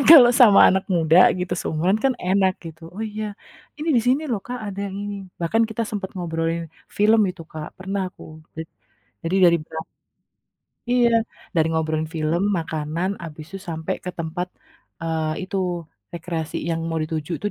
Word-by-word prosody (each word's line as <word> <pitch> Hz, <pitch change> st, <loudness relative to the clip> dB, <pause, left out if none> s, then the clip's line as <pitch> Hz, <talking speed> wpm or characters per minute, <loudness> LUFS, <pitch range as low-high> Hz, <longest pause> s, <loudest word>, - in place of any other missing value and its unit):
Kan, -, -, +1 dB
kalau 250 Hz, -7 st, +11 dB
sama 210 Hz, -5 st, +8 dB
anak 190 Hz, 0 st, +2 dB
muda, 165 Hz, +1 st, +4 dB, 0.2 s
gitu, 180 Hz, 0 st, -2 dB
seumuran 175 Hz, +6 st, +1 dB
kan, 265 Hz, -, +4 dB, 0.2 s
enak 190 Hz, -1 st, +3 dB
gitu. 160 Hz, 0 st, -10 dB
"Oh 220 Hz, -, -4 dB
iya, 215 Hz, 0 st, -3 dB, 0.5 s
ini 315 Hz, +2 st, -3 dB
di -, -, +5 dB
sini 265 Hz, +5 st, +3 dB
loh 210 Hz, -4 st, 0 dB
Kak, 250 Hz, 0 st, -4 dB
ada 200 Hz, -1 st, -6 dB
yang 195 Hz, -, -7 dB
ini." 205 Hz, 0 st, -4 dB, 0.2 s
Bahkan 220 Hz, +7 st, +2 dB
kita 230 Hz, +1 st, -2 dB
sempet 200 Hz, -3 st, -4 dB
ngobrolin 165 Hz, -1 st, -1 dB, 0.4 s
film 215 Hz, +2 st, +5 dB
itu, 180 Hz, -2 st, -10 dB
Kak, 155 Hz, -1 st, -6 dB
pernah 195 Hz, +1 st, -3 dB
aku -, -, -15 dB, 0.3 s
jad 160 Hz, 0 st, -6 dB, 0.6 s
jadi 175 Hz, +3 st, 0 dB
dari 170 Hz, -, +4 dB
bera 160 Hz, +1 st, -6 dB, 1.1 s
Iya. 245 Hz, -1 st, +4 dB, 0.4 s
Dari 160 Hz, -1 st, +3 dB
ngobrolin 160 Hz, -1 st, -1 dB
film, 160 Hz, +3 st, 0 dB, 0.2 s
makanan, 160 Hz, +2 st, -2 dB
habis 155 Hz, -2 st, -8 dB
itu 195 Hz, -, -5 dB
sampai 160 Hz, -1 st, -2 dB
ke 180 Hz, -, -2 dB
tempat, 170 Hz, +2 st, -3 dB, 0.6 s
eee 160 Hz, 0 st, -1 dB
itu, 195 Hz, -, -4 dB, 0.6 s
rekreasi 165 Hz, -2 st, -4 dB
yang 165 Hz, 0 st, -1 dB
mau 165 Hz, 0 st, -1 dB
dituju 155 Hz, +1 st, -4 dB
tuh 205 Hz, -, 0 dB
175 Hz, 170 wpm, -23 LUFS, 160-205 Hz, 1.1 s, kalau